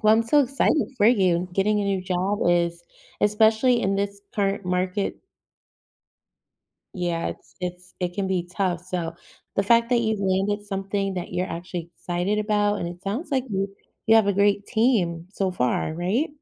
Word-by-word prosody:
Well, 215 Hz, 0 st, +5 dB
I'm 225 Hz, -, +3 dB
so 260 Hz, +6 st, +4 dB
excited 275 Hz, +3 st, +1 dB
for 210 Hz, -3 st, +4 dB
you. 185 Hz, -6 st, +3 dB
Getting 210 Hz, +3 st, +2 dB
a -, -, -1 dB
new 195 Hz, -1 st, 0 dB
job 185 Hz, +2 st, -1 dB
is 170 Hz, 0 st, +1 dB, 0.4 s
especially 220 Hz, +4 st, +4 dB
in 195 Hz, -1 st, +1 dB
this 200 Hz, 0 st, -2 dB
current 200 Hz, -1 st, 0 dB
market 180 Hz, +2 st, -1 dB, 1.8 s
Yeah, 175 Hz, -3 st, -1 dB
it's -, -, -10 dB
it's 180 Hz, 0 st, -6 dB
it 180 Hz, -1 st, -2 dB
can 200 Hz, 0 st, -1 dB
be 180 Hz, -2 st, -1 dB
tough, 180 Hz, -3 st, -1 dB
so 175 Hz, -2 st, -4 dB, 0.4 s
the 195 Hz, -, +3 dB
fact 230 Hz, +3 st, +3 dB
that 245 Hz, -, +4 dB
you've 220 Hz, -3 st, 0 dB
landed 195 Hz, +2 st, 0 dB
something 195 Hz, 0 st, -2 dB
that 180 Hz, -1 st, -5 dB
you're 180 Hz, -, -1 dB
actually 170 Hz, -1 st, -6 dB
excited 180 Hz, +5 st, -1 dB
about, 210 Hz, -1 st, +1 dB
and 170 Hz, -, -3 dB
it 175 Hz, +1 st, -10 dB
sounds 215 Hz, -, -3 dB
like 265 Hz, -2 st, +1 dB
you 195 Hz, 0 st, -1 dB, 0.4 s
you 225 Hz, -, +6 dB
have 220 Hz, -2 st, +5 dB
a 200 Hz, -, +3 dB
great 200 Hz, +1 st, +2 dB
team 190 Hz, -8 st, +1 dB
so 195 Hz, -1 st, -1 dB
far, 140 Hz, 0 st, 0 dB
right? 190 Hz, -, 0 dB
195 Hz, 175 wpm, -24 LUFS, 180-210 Hz, 1.8 s, you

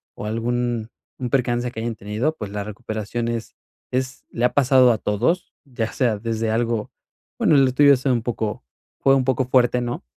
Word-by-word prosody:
o -, -, -7 dB
algún 120 Hz, 0 st, -1 dB, 0.3 s
un 125 Hz, -2 st, -3 dB
percance 120 Hz, -1 st, 0 dB
que 110 Hz, -, -7 dB
hayan 115 Hz, 0 st, -3 dB
tenido, 110 Hz, +10 st, -2 dB
pues, 105 Hz, -2 st, -6 dB
la 100 Hz, 0 st, -3 dB
recuperación 110 Hz, +2 st, -4 dB
es 115 Hz, -1 st, -4 dB, 0.4 s
es, 130 Hz, 0 st, -3 dB
le 120 Hz, -, 0 dB
ha 125 Hz, -, +1 dB
pasado 130 Hz, -2 st, +5 dB
a 115 Hz, -, +1 dB
todos, 120 Hz, -, 0 dB
ya 120 Hz, -5 st, -3 dB
sea 115 Hz, -6 st, +1 dB
desde 115 Hz, 0 st, -1 dB
algo, 115 Hz, -1 st, -1 dB, 0.5 s
bueno, 150 Hz, -, +4 dB
lo 135 Hz, -2 st, +4 dB
tuyo 145 Hz, +1 st, +6 dB
ha -, -, +3 dB
sido 130 Hz, 0 st, 0 dB
un 115 Hz, -, -2 dB
poco 110 Hz, -, -3 dB, 0.4 s
fue 135 Hz, 0 st, +4 dB
un 135 Hz, -, +2 dB
poco 130 Hz, 0 st, +1 dB
fuerte, 125 Hz, -1 st, +3 dB
¿no? 120 Hz, -, -4 dB
120 Hz, 195 wpm, -22 LUFS, 110-130 Hz, 0.5 s, tuyo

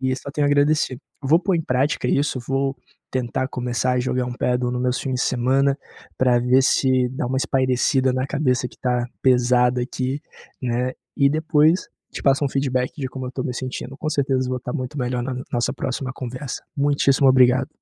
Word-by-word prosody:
E 130 Hz, 0 st, 0 dB
só 140 Hz, -, -7 dB
tenho 145 Hz, 0 st, 0 dB
a -, -, +2 dB
agradecer. 145 Hz, -3 st, +2 dB, 0.2 s
Vou 150 Hz, +5 st, +4 dB
pôr 190 Hz, +1 st, 0 dB
em 165 Hz, -, 0 dB
prática 130 Hz, -1 st, 0 dB
isso. 140 Hz, -1 st, +1 dB
Vou 135 Hz, +2 st, -1 dB, 0.4 s
tentar 130 Hz, 0 st, -1 dB
começar 125 Hz, 0 st, -1 dB
a 125 Hz, -, +1 dB
jogar 125 Hz, 0 st, -1 dB
um 125 Hz, -, -4 dB
padel 125 Hz, 0 st, 0 dB
nos 125 Hz, 0 st, -2 dB
meus 125 Hz, 0 st, 0 dB
fins 130 Hz, -, -3 dB
de -, -, -2 dB
semana 135 Hz, +3 st, +2 dB, 0.4 s
pra 125 Hz, -2 st, +3 dB
ver 125 Hz, +2 st, +4 dB
se 130 Hz, -1 st, +2 dB
dá 130 Hz, -1 st, -3 dB
uma 130 Hz, +2 st, -1 dB
espairecida 130 Hz, 0 st, +2 dB
na 130 Hz, +1 st, -1 dB
cabeça, 130 Hz, -3 st, 0 dB
que -, -, -14 dB
tá 125 Hz, -1 st, 0 dB, 0.2 s
pesada 125 Hz, -1 st, +3 dB
aqui, 130 Hz, +2 st, -3 dB, 0.4 s
né. 125 Hz, +1 st, -1 dB, 0.2 s
E 140 Hz, -1 st, +4 dB
depois, 155 Hz, +2 st, +2 dB, 0.2 s
te -, -, -6 dB
passo 140 Hz, +1 st, +3 dB
um 140 Hz, -, +1 dB
feedback 130 Hz, -2 st, 0 dB
de 135 Hz, -, -2 dB
como 130 Hz, 0 st, -6 dB
eu -, -, -5 dB
tô 130 Hz, -, -3 dB
me 125 Hz, -, -3 dB
sentindo. 130 Hz, +1 st, -5 dB
Com 155 Hz, -, -3 dB
certeza, 135 Hz, -3 st, +1 dB
eu 125 Hz, -, -4 dB
vou 130 Hz, -, -1 dB
estar 125 Hz, 0 st, -6 dB
muito 135 Hz, 0 st, -4 dB
melhor 125 Hz, -1 st, -1 dB
n 130 Hz, -, -3 dB
na 125 Hz, -, -5 dB
nossa 120 Hz, -1 st, 0 dB
próxima 130 Hz, 0 st, -3 dB
conversa. 130 Hz, +2 st, -6 dB
Muitíssimo 140 Hz, -1 st, +3 dB
obrigado. 130 Hz, 0 st, +4 dB
130 Hz, 205 wpm, -22 LUFS, 125-135 Hz, 0.4 s, Vou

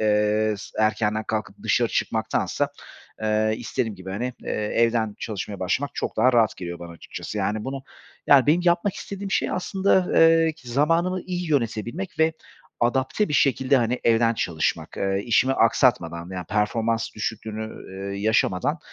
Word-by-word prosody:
eee, 105 Hz, 0 st, +2 dB
s 110 Hz, +2 st, -4 dB
erkenden 110 Hz, 0 st, +1 dB
kalkıp 110 Hz, -1 st, -3 dB
dışarı -, -, +2 dB
çıkmaktansa, -, -, -1 dB, 0.5 s
eee, 110 Hz, 0 st, +1 dB
istediğim 115 Hz, -2 st, -3 dB
gibi, 95 Hz, 0 st, -9 dB
hani, 120 Hz, +6 st, -3 dB
eee, -, -, -4 dB
evden 110 Hz, 0 st, +1 dB
çalışmaya 100 Hz, -2 st, -5 dB
başlamak 125 Hz, +10 st, 0 dB
çok -, -, -3 dB
daha 125 Hz, +4 st, +4 dB
rahat 115 Hz, -2 st, +3 dB
geliyor 85 Hz, -1 st, -6 dB
bana, 85 Hz, -1 st, -9 dB
açıkçası. 85 Hz, -, -7 dB
Yani, 105 Hz, +1 st, -1 dB
bunu, 135 Hz, 0 st, -5 dB, 0.4 s
yani, 140 Hz, -2 st, +6 dB
benim 160 Hz, +4 st, +4 dB
yapmak 175 Hz, +3 st, +2 dB
istediğim 200 Hz, -1 st, -6 dB
şey -, -, +1 dB
aslında, 190 Hz, 0 st, +1 dB
eee, 165 Hz, 0 st, +5 dB
zamanımı 165 Hz, +9 st, +1 dB
iyi 180 Hz, -2 st, -4 dB
yönetebilmek 130 Hz, -, -2 dB
ve 160 Hz, 0 st, +3 dB, 0.5 s
adapte 130 Hz, -, +1 dB
bir -, -, -4 dB
şekilde, 135 Hz, 0 st, +3 dB
hani, 120 Hz, 0 st, 0 dB
evden 115 Hz, 0 st, +3 dB
çalışmak, 80 Hz, -6 st, -2 dB
eee, 95 Hz, 0 st, 0 dB
işimi 125 Hz, +3 st, +3 dB
aksatmadan, 90 Hz, -9 st, +2 dB
yani, 90 Hz, -1 st, -5 dB
performans 115 Hz, +2 st, 0 dB
düşüklüğünü, 110 Hz, 0 st, -4 dB, 0.4 s
eee, 100 Hz, -, -5 dB
yaşamadan 110 Hz, -, +1 dB
115 Hz, 150 wpm, -24 LUFS, 105-145 Hz, 0.5 s, yani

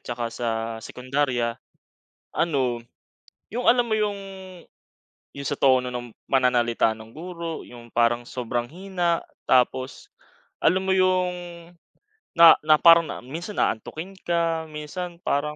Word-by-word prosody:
tsaka 120 Hz, -1 st, -4 dB
sa 120 Hz, 0 st, -3 dB, 0.3 s
sekondarya. 125 Hz, -1 st, -2 dB, 0.7 s
Ano, 130 Hz, -8 st, 0 dB, 0.7 s
yung 245 Hz, +3 st, -4 dB
alam 245 Hz, -1 st, +1 dB
mo 220 Hz, -, +1 dB
yung 210 Hz, -2 st, -1 dB, 1.2 s
yung 140 Hz, 0 st, -6 dB
sa 145 Hz, -, -3 dB
tono 130 Hz, -2 st, +3 dB
ng 120 Hz, -2 st, -7 dB
pananalita 120 Hz, -4 st, +2 dB
nung 110 Hz, 0 st, -13 dB
guro, 170 Hz, 0 st, -6 dB
yung 120 Hz, -1 st, -13 dB
parang 120 Hz, 0 st, +2 dB
sobrang 120 Hz, 0 st, -3 dB
hina. 175 Hz, -1 st, -1 dB, 0.2 s
Tapos 130 Hz, -, +1 dB, 0.6 s
alam 190 Hz, +1 st, +3 dB
mo 190 Hz, -, +3 dB
yung 185 Hz, -1 st, +2 dB, 1.0 s
na 170 Hz, -1 st, +10 dB
na 155 Hz, 0 st, +5 dB
parang 165 Hz, 0 st, +7 dB
na -, -, -7 dB
minsan 170 Hz, -, -7 dB
aantukin 160 Hz, -, -2 dB
ka, 165 Hz, -1 st, 0 dB
minsan 170 Hz, +3 st, -6 dB
parang 150 Hz, +1 st, -1 dB
150 Hz, 125 wpm, -24 LUFS, 120-175 Hz, 1.2 s, na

